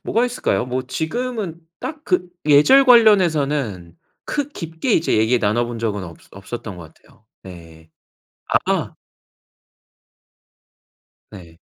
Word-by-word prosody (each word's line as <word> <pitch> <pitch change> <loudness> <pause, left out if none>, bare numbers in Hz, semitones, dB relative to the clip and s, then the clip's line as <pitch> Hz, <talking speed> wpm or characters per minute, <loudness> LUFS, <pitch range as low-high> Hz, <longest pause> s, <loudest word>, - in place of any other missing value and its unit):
뭐가 235 +2 +1
있을까요? 240 - -1
뭐 125 +1 -3
지금은 200 - -4 0.2
딱 310 -1 -6
그 180 -2 0 0.2
예절 155 - +6
관련해서는 150 - +3 0.3
크 290 -1 -3
깊게 165 - -4
이제 160 - +2
얘기 110 +3 +2
나눠본 120 +2 -1
적은 105 -3 -2
없어 85 -3 -12
없었던 100 0 -8
것 80 -2 -12
같아요. 110 - -26 0.2
네. 80 -3 -14 0.6
아하. - - 0 2.4
네. 85 -5 -13
130 Hz, 225 characters per minute, -20 LUFS, -, 2.4 s, 예절